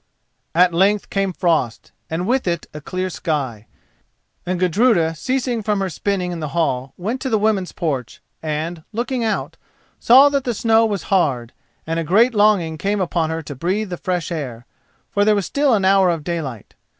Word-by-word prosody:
At 180 Hz, 0 st, +5 dB
length 195 Hz, +4 st, +2 dB
came 195 Hz, -1 st, 0 dB
frost, 160 Hz, -10 st, -1 dB, 0.2 s
and 165 Hz, +3 st, -2 dB
with 250 Hz, 0 st, 0 dB
it 170 Hz, -2 st, -1 dB
a 150 Hz, -, -7 dB
clear 185 Hz, +5 st, -3 dB
sky, 135 Hz, -, -3 dB, 0.8 s
and 180 Hz, -1 st, -1 dB
Gudruda, 180 Hz, -2 st, +3 dB
ceasing 250 Hz, -, -1 dB
from 210 Hz, -1 st, 0 dB
her 190 Hz, -2 st, -2 dB
spinning 180 Hz, +2 st, -2 dB
in 175 Hz, -, -5 dB
the 155 Hz, -, -3 dB
hall, 130 Hz, -5 st, -1 dB
went 220 Hz, +8 st, -3 dB
to 265 Hz, -, -2 dB
the 220 Hz, -, +2 dB
woman's 210 Hz, -3 st, 0 dB
porch, 135 Hz, -8 st, -3 dB, 0.2 s
and, 160 Hz, +2 st, -3 dB
looking 240 Hz, +2 st, -2 dB
out, 220 Hz, -, -2 dB, 0.4 s
saw 265 Hz, +4 st, +7 dB
that 280 Hz, -1 st, 0 dB
the 240 Hz, -3 st, -2 dB
snow 225 Hz, +1 st, +3 dB
was 200 Hz, -4 st, -3 dB
hard, 130 Hz, -10 st, +1 dB, 0.3 s
and 165 Hz, +1 st, -1 dB
a -, -, -1 dB
great 220 Hz, +10 st, +4 dB
longing 200 Hz, -7 st, +2 dB
came 200 Hz, +3 st, 0 dB
upon 170 Hz, -3 st, 0 dB
her 160 Hz, 0 st, -3 dB
to 145 Hz, -, -7 dB
breathe 185 Hz, +8 st, -2 dB
the -, -, -1 dB
fresh 180 Hz, -1 st, -2 dB
air, 125 Hz, -8 st, -5 dB, 0.5 s
for 205 Hz, -, +2 dB
there 210 Hz, 0 st, +4 dB
was 200 Hz, -3 st, -1 dB
still 280 Hz, -4 st, +2 dB
an 195 Hz, -3 st, 0 dB
hour 190 Hz, -1 st, +5 dB
of 165 Hz, -3 st, -1 dB
daylight. 150 Hz, -, -5 dB
180 Hz, 185 wpm, -20 LUFS, 160-210 Hz, 0.8 s, saw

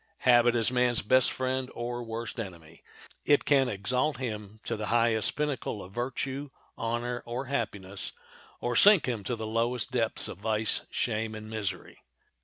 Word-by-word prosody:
Habit 120 Hz, -1 st, +6 dB
is 115 Hz, +1 st, +3 dB
man's 125 Hz, -2 st, +2 dB
best 130 Hz, +4 st, +4 dB
friend 130 Hz, 0 st, -2 dB
or 120 Hz, +1 st, -3 dB
worst 115 Hz, 0 st, -5 dB
enemy. 85 Hz, -6 st, -8 dB, 0.4 s
It 145 Hz, -1 st, +3 dB
can 135 Hz, -3 st, +4 dB
exalt 125 Hz, +8 st, 0 dB
him 110 Hz, -4 st, -5 dB
to -, -, -2 dB
the 105 Hz, 0 st, -4 dB
highest 115 Hz, -2 st, +2 dB
pinnacle 145 Hz, -8 st, -2 dB
of 90 Hz, +1 st, -12 dB
virtue, 130 Hz, +4 st, -3 dB, 0.3 s
honor, 120 Hz, +1 st, -2 dB
or 120 Hz, +3 st, -4 dB
happiness, 100 Hz, -7 st, -2 dB, 0.5 s
or 120 Hz, 0 st, -2 dB
sink 200 Hz, -, +7 dB
him 115 Hz, -5 st, -2 dB
to 120 Hz, -, -1 dB
the 110 Hz, -1 st, -5 dB
lowest 115 Hz, +3 st, -1 dB
depths 115 Hz, -3 st, 0 dB
of 90 Hz, -, -8 dB
vice, 110 Hz, 0 st, +1 dB
shame, 110 Hz, 0 st, -1 dB
and 110 Hz, 0 st, -8 dB
misery. 110 Hz, -3 st, -4 dB
120 Hz, 160 wpm, -29 LUFS, 110-125 Hz, 0.5 s, sink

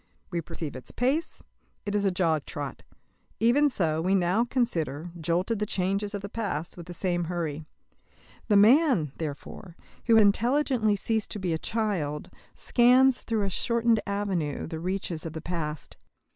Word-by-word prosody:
We 170 Hz, -2 st, -1 dB
perceive 165 Hz, -3 st, -6 dB
its 130 Hz, -, -7 dB
pace; 275 Hz, +7 st, -1 dB, 0.4 s
it 205 Hz, -, -3 dB
is 205 Hz, -1 st, +1 dB
a -, -, +4 dB
jog 165 Hz, -5 st, 0 dB
trot. 145 Hz, -2 st, -6 dB, 0.6 s
Even 270 Hz, +6 st, +4 dB
so, 160 Hz, -, 0 dB
we 185 Hz, +3 st, +2 dB
now 185 Hz, +4 st, +2 dB
consider, 175 Hz, -, -2 dB
jolted 180 Hz, +7 st, 0 dB
the 210 Hz, -, 0 dB
changes 195 Hz, +3 st, -1 dB
of 200 Hz, -, -5 dB
the -, -, -3 dB
past, 195 Hz, -7 st, -4 dB
with 175 Hz, -1 st, -10 dB
the 175 Hz, -, -7 dB
same 175 Hz, -2 st, -1 dB
hurry. 160 Hz, -3 st, -3 dB, 0.8 s
The 205 Hz, -, +4 dB
man, 225 Hz, -, +5 dB
therefore, 165 Hz, +4 st, -7 dB, 0.3 s
who 230 Hz, -, +6 dB
has 220 Hz, -, +7 dB
intelligently 235 Hz, +1 st, +2 dB
ceased 220 Hz, +2 st, -1 dB
to 210 Hz, -, -5 dB
be 180 Hz, -3 st, -1 dB
a 160 Hz, -, -1 dB
child 185 Hz, -11 st, -2 dB, 0.2 s
scans 250 Hz, +1 st, +4 dB
through 225 Hz, -3 st, -1 dB
a 195 Hz, -, 0 dB
shortened 235 Hz, +2 st, +2 dB
avenue 195 Hz, -7 st, -2 dB
the 160 Hz, 0 st, -6 dB
reaches 180 Hz, -2 st, -3 dB
of 165 Hz, -, -6 dB
the 160 Hz, -, -5 dB
past. 155 Hz, -3 st, -5 dB
195 Hz, 165 wpm, -27 LUFS, 165-225 Hz, 0.8 s, has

